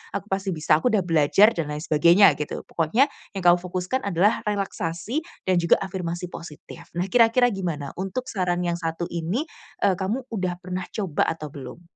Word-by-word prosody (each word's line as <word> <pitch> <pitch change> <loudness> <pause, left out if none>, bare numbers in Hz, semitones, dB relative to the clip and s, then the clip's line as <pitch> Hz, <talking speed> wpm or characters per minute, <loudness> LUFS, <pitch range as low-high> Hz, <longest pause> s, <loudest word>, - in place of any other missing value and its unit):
aku - - -4
pasti 195 -1 -1
bisa, 155 0 +3
aku 250 - 0
sudah 205 -3 +3
belajar," 170 +6 +4
dan 165 -3 -2
lain 150 +1 -5
sebagainya 170 +5 +6
gitu. 150 - -4
Pokoknya 195 - +2 0.3
yang 190 - -4
kamu 175 0 +7
fokuskan 185 +7 -3
adalah 200 +3 +2
relaksasi 195 - -2 0.3
dan 185 -2 +3
juga 170 -1 +4
afirmasi 180 -2 -4
positif. 160 -3 -10
Nah 175 +2 -1
kira-kira 245 +1 +4
gimana 170 -8 -4
untuk 195 +7 -3
saran 180 -3 -1
yang 170 -1 -1
1 165 0 -3
ini, 175 - -2 0.4
eee, 200 - +5
kamu 210 +8 -2
udah 185 -4 -1
pernah 185 0 -4
coba 190 -9 -1
atau 155 -3 -4
belum? 135 +4 -9
180 Hz, 175 wpm, -24 LUFS, 165-200 Hz, 0.4 s, kamu